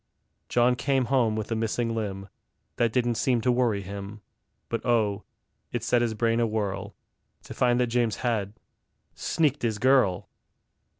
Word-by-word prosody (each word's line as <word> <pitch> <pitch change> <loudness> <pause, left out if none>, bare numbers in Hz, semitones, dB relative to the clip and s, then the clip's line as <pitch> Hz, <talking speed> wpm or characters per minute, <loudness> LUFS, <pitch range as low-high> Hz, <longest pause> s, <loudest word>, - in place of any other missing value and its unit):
John 120 +1 +3
came 135 +1 +1
home 115 -5 +3
with 110 +1 -4
a - - +1
missing 115 +1 -1
limb; 100 -3 -4 0.5
That 115 -2 +2
didn't 120 -2 0
seem 125 -3 +2
to 125 - +2
worry 120 -5 +1
him; 100 +2 -7 0.5
But 115 - -3
oh, 110 -4 +1 0.5
it 120 -2 -3
set 120 0 +2
his 115 -2 0
brain 115 +1 +1
awhirl 105 -3 -2 0.5
To - - -9
find 120 0 +2
that 125 - +3
James 120 -3 +1
had 105 -4 0 0.6
sneaked 150 -3 0
his 110 -3 0
girl! 105 -7 +3
115 Hz, 155 wpm, -26 LUFS, 105-120 Hz, 0.6 s, John